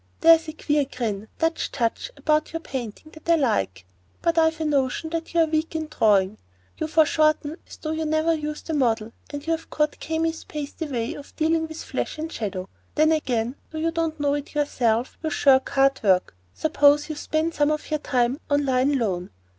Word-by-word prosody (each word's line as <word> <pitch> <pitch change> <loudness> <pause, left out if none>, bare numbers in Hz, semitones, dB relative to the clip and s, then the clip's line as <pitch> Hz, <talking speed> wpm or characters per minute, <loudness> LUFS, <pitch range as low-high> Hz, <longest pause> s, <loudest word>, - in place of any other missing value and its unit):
There's 330 0 +6
a 310 - -5
queer 295 -2 +1
grim, 220 -6 -4
Dutch 325 0 0
touch 235 - -1
about 305 0 +1
your 330 - -2
painting 265 -1 -6
that 315 +1 -11
I 335 - +7
like; 95 - 0 0.4
but 335 - +2
I've 320 -1 +3
a 320 - -1
notion 290 +2 0
that 330 0 -3
you're 335 -1 +5
weak 315 +1 -1
in 315 -1 -3
drawing. 210 -7 +2 0.4
You 315 - -1
foreshorten 310 -1 +2
as - - -11
though 310 - -4
you 315 0 -2
never 315 +1 +2
used 300 -1 -4
the 325 - -3
model, 230 -6 +1 0.2
and 290 0 -6
you've 330 0 -2
caught 300 -1 0
Kami's 320 0 -2
pasty 300 +2 -5
way 240 -4 -2
of 285 - -11
dealing 320 +1 +1
with 315 0 -7
flesh - - -3
in 315 +1 -4
shadow. 195 - -4 0.3
Then, 310 +1 +4
again, 250 -5 0
though 315 - -7
you 325 +1 0
don't 325 -2 -2
know 285 -1 +2
it 290 +1 -4
yourself, 245 -5 0
you 320 - -1
shirk 270 -3 +4
hard 275 0 +3
work. 185 - +2 0.2
Suppose 295 -1 +4
you 310 - -3
spend 315 +2 -1
some 295 -1 +2
of 305 0 -2
your 305 - +1
time 255 -1 0
on 285 0 +2
line 260 +2 +2
alone. 185 -6 -1
300 Hz, 195 wpm, -24 LUFS, 255-320 Hz, 0.4 s, I